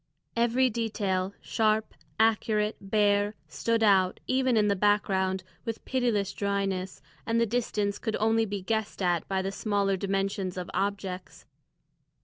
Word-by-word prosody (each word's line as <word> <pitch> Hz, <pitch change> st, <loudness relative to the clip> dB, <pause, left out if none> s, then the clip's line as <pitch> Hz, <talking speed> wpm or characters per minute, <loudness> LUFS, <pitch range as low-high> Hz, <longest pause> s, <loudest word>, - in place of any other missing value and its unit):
Every 240 Hz, +2 st, +3 dB
detail, 205 Hz, -5 st, -1 dB
sharp, 220 Hz, -1 st, +1 dB, 0.3 s
accurate, 215 Hz, -1 st, +2 dB
bare, 205 Hz, +1 st, +2 dB
stood 230 Hz, +8 st, 0 dB
out, 190 Hz, -3 st, +4 dB
even 260 Hz, -2 st, +2 dB
in 210 Hz, -1 st, +4 dB
the 200 Hz, -, +2 dB
background, 190 Hz, -2 st, +1 dB, 0.2 s
with 225 Hz, -1 st, -5 dB
pitiless 230 Hz, -7 st, 0 dB
dryness, 195 Hz, -2 st, -2 dB, 0.2 s
and 230 Hz, 0 st, +1 dB
the 230 Hz, -, +4 dB
distance 210 Hz, -3 st, -1 dB
could 220 Hz, -2 st, -2 dB
only 225 Hz, +1 st, +2 dB
be 200 Hz, -2 st, -4 dB
guessed 220 Hz, -1 st, -2 dB
at 175 Hz, -2 st, +1 dB
by 190 Hz, -1 st, -1 dB
the 195 Hz, -, -2 dB
smaller 200 Hz, -1 st, 0 dB
dimensions 195 Hz, -1 st, -1 dB
of 180 Hz, -1 st, -5 dB
objects. 195 Hz, -2 st, -3 dB
205 Hz, 135 wpm, -28 LUFS, 195-225 Hz, 0.3 s, out